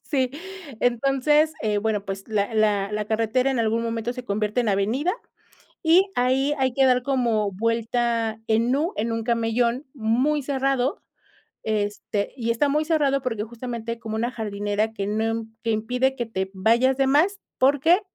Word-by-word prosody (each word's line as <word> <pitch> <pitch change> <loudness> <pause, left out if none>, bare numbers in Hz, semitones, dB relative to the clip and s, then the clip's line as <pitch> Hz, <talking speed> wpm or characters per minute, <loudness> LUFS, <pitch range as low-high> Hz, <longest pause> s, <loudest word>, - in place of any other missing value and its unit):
Sí. 260 -4 0 0.5
Entonces, 275 +5 +2
eh, 210 -1 +1
bueno, 210 -1 -1
pues, 195 0 -6
la 215 0 -1
la 205 -2 +2
la 210 0 -1
carretera 225 +4 +1
en 265 - -1
algún 230 0 +1
momento 230 +1 -2
se 250 -1 -8
convierte 210 +3 -1
en 235 - 0
avenida, 220 - +1 0.7
y 360 +4 +4
ahí 265 +3 +2
hay 260 -2 +1
que 270 +1 +3
dar 250 -1 +3
como 235 -6 +1
vuelta 230 +1 0
en 230 +3 +2
U, 320 +7 0
en 230 +2 -1
un 225 0 -2
camellón 235 +3 0
muy 260 +5 +1
cerrado, 270 0 0 0.6
este 205 -1 -2
y 230 -1 0
está 260 +5 +1
muy 300 +2 +1
cerrado 285 -4 +2
porque 225 -5 -2
justamente 235 0 -6
como 220 -1 -5
una 235 +3 -1
jardinera 210 -1 -2
que 200 -2 -3
no 215 +2 0
m 225 0 -2 0.2
que 230 - 0
impide 250 +5 0
que 240 -2 -3
te 190 -4 -3
vayas 230 +7 +3
de 270 - +2
más, 335 +9 +3 0.2
porque 290 +8 +4
235 Hz, 170 wpm, -24 LUFS, 220-265 Hz, 0.7 s, y